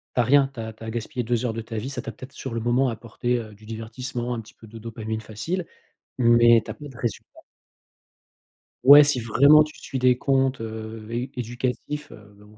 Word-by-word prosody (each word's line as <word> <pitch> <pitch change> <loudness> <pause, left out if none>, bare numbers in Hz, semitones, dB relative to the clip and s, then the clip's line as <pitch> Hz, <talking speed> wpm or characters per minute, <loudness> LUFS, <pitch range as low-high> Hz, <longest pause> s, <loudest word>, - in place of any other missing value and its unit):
Tu - - +1
as - - +2
rien, 135 +1 +4
tu 120 - -10
as 110 0 -5
tu 110 - -14
as 110 - -5
gaspillé 120 +2 -4
2 120 +1 -1
heures 115 - -1
de 115 - -4
ta 115 0 -7
vie, 125 +6 -4
ça 135 -3 -4
t'a 115 - -6
peut-être 130 +3 -12
sur 130 -4 -6
le 115 - -2
moment 120 +3 +2
apporté, 120 +2 -2
heu, 110 -2 -9
du 110 - -18
divertissement, 120 +3 -5
un 115 - -4
petit 110 - -17
peu 110 - -15
de 115 +2 -11
dopamine 110 -1 -5
facile, 115 - -4 0.5
mais 120 -1 +6
tu - - -5
as - - -6
pas 150 - -10
de 130 -4 -13
résultats. 120 -4 -5 1.4
Ouais 145 +2 +10
si 145 -4 +1
vraiment 140 +7 +6
tu 150 0 -8
suis 135 - -5
des 125 -1 +4
comptes, 135 -2 +1
heu, 110 0 -7
é 120 +3 -3
éducatifs, 125 +5 -4
mais 105 -1 -16
bon 105 +1 -19
120 Hz, 225 wpm, -24 LUFS, 110-130 Hz, 1.4 s, Ouais